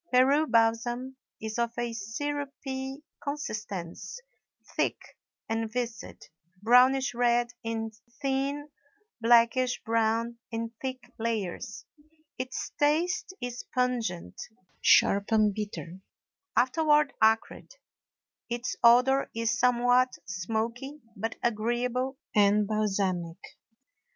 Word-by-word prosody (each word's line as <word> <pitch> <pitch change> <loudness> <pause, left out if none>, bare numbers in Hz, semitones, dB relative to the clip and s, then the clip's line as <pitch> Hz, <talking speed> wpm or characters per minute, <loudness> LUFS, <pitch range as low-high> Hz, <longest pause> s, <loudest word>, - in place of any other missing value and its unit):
Peru 275 +5 +4
balsam 240 +2 +1 0.2
is 220 +1 -4
of 235 0 -1
a 240 -1 -2
syrupy 270 +4 -4 0.2
consistence, 215 - -5 0.6
thick - - +1 0.5
and 225 0 -2
viscid, 235 -2 -4 0.4
brownish 255 +3 +5
red 240 0 +2
in 225 -1 -3 0.3
thin, 280 +1 -1 0.5
blackish 240 +2 +4
brown 230 +1 0
in 230 -1 -4
thick 255 -2 -5
layers. 220 -5 -3 0.5
Its 255 0 -4
taste 335 +6 +1
is 245 0 -5
pungent, 230 - -1 0.4
sharp, 200 +2 +4
and 215 -2 +4
bitter, 195 -4 -6 0.6
afterward 295 +3 +3
acrid; 220 0 +2 0.8
its 240 +1 -2
odor 250 +3 +5
is 230 0 +1
somewhat 250 +1 +3
smoky, 225 +9 -3 0.2
but 225 +3 -3
agreeable 240 +3 0 0.2
and 205 0 +4
balsamic. 195 -5 -1
235 Hz, 90 wpm, -28 LUFS, 220-260 Hz, 0.8 s, brownish